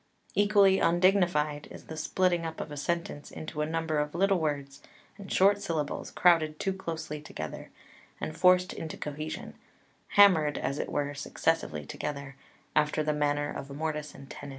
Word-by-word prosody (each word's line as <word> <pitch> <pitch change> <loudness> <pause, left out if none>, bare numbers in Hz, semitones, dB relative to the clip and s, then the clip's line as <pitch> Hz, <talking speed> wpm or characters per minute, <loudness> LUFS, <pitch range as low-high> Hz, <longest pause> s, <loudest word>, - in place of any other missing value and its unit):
Equally 200 -2 +5
undignified 175 -5 +2
is - - -11
the 160 - -7
splitting 175 +2 +1
up 160 -1 -5
of - - -5
a - - -5
sentence 155 -1 -3
into 155 -1 -6
a 150 - 0
number 160 -1 -1
of 150 +1 -2
little 195 +1 +3
words 140 -3 -3 0.4
and 195 -2 -9
short 200 +2 +4
syllables 160 -6 -2
crowded 160 -3 +3
too 195 - 0
closely 160 -5 -5
together 80 - -7 0.5
and 155 - -4
forced 180 +2 +4
into 160 - -6
cohesion, 150 +1 -5 0.6
hammered, 165 -8 +6
as 140 - -2
it - - -3
were, 145 0 -1
successively 140 - -1
together, 140 - -5 0.4
after 150 +1 +2
the 150 0 +1
manner 145 0 0
of 135 - -6
mortice 150 +1 -4
and 135 - -12
tenon. 140 - -8
155 Hz, 160 wpm, -29 LUFS, 145-175 Hz, 0.6 s, hammered